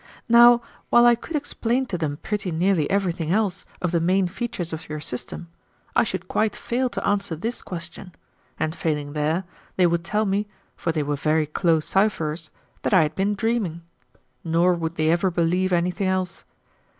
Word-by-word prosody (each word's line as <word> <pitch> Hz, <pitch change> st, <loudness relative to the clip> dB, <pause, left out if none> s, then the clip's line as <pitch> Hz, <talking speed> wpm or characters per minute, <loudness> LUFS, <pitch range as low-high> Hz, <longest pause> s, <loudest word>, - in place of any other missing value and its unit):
Now, 240 Hz, 0 st, +7 dB, 0.3 s
while 240 Hz, 0 st, +6 dB
I 240 Hz, -, +7 dB
could 315 Hz, +7 st, -5 dB
explain 260 Hz, -3 st, -1 dB
to 200 Hz, -, -4 dB
them 155 Hz, -4 st, -2 dB
pretty 210 Hz, -3 st, -2 dB
nearly 170 Hz, -2 st, +1 dB
everything 180 Hz, -5 st, 0 dB
else 195 Hz, -2 st, 0 dB, 0.2 s
of 175 Hz, -, +1 dB
the 170 Hz, -, +2 dB
main 185 Hz, +3 st, +2 dB
features 190 Hz, -4 st, -4 dB
of 160 Hz, 0 st, -7 dB
your 155 Hz, 0 st, -4 dB
system, 150 Hz, +4 st, -5 dB, 0.5 s
I -, -, +5 dB
should -, -, -4 dB
quite 215 Hz, -1 st, 0 dB
fail 250 Hz, +2 st, -1 dB
to -, -, -3 dB
answer 200 Hz, -4 st, 0 dB
this 225 Hz, +10 st, -3 dB
question, 180 Hz, +1 st, -8 dB, 0.5 s
and 155 Hz, +1 st, -1 dB
failing 150 Hz, -4 st, -2 dB
there, 155 Hz, +4 st, 0 dB, 0.3 s
they 185 Hz, -, +4 dB
would 170 Hz, -1 st, +1 dB
tell 210 Hz, +5 st, 0 dB
me, 200 Hz, +1 st, 0 dB, 0.3 s
for 165 Hz, -, -1 dB
they 155 Hz, -2 st, -1 dB
were 145 Hz, 0 st, -1 dB
very 155 Hz, +2 st, +1 dB
close 160 Hz, +1 st, +1 dB
cipherers, 165 Hz, -6 st, 0 dB, 0.3 s
that -, -, +2 dB
I 175 Hz, -, +6 dB
had 150 Hz, 0 st, -2 dB
been 200 Hz, +4 st, 0 dB
dreaming; 200 Hz, -7 st, -1 dB, 0.6 s
nor 170 Hz, +2 st, +3 dB
would 165 Hz, -1 st, -3 dB
they 155 Hz, 0 st, +2 dB
ever 175 Hz, +3 st, +2 dB
believe 180 Hz, +2 st, +1 dB
anything 180 Hz, +2 st, +1 dB
else. 185 Hz, -1 st, -2 dB
180 Hz, 180 wpm, -24 LUFS, 160-205 Hz, 0.6 s, Now